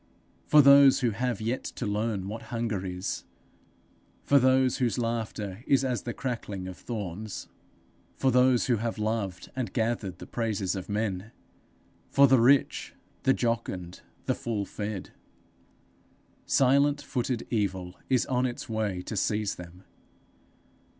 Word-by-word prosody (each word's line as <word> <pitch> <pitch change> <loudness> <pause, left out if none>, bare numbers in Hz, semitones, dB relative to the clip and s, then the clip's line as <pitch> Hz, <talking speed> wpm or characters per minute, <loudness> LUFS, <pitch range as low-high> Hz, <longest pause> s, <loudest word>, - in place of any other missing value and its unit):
for 150 -1 +7
those 140 0 +7
who 120 -2 +2
have 120 0 -2
yet 115 +4 -2
to - - -5
learn 105 -2 -1
what 110 +3 -5
hunger 115 -5 -2
is! 90 0 -4 1.0
for 140 - +5
those 130 0 +3
whose 125 -1 0
laughter 115 -3 -3
is 135 -1 +3
as 125 -4 -1
the 120 - -4
crackling 105 -7 -4
of 95 - -7
thorns! 105 -2 -6 0.7
for 135 - +2
those 125 0 +4
who 120 -3 +2
have 115 +2 -3
loved 105 -4 -3
and 130 -3 -3
gathered 110 -6 -1
the - - -9
praises 105 -5 -2
of 95 +1 -6
men! 105 0 -2 0.8
for 140 - +6
the 130 -1 +5
rich, 135 +3 +3 0.3
the 130 - +4
jocund, 115 -7 -2 0.2
the - - +2
full 105 -4 -3
fed! 105 -1 -5 1.4
Silent 140 +2 +4
footed 125 -2 -2
evil 95 -5 -1 0.2
is 130 -3 +3
on 130 0 +1
its 120 - -6
way 105 -5 -2
to 110 - -5
seize 105 +1 0
them. 90 +1 -11
115 Hz, 140 wpm, -28 LUFS, 100-125 Hz, 1.4 s, for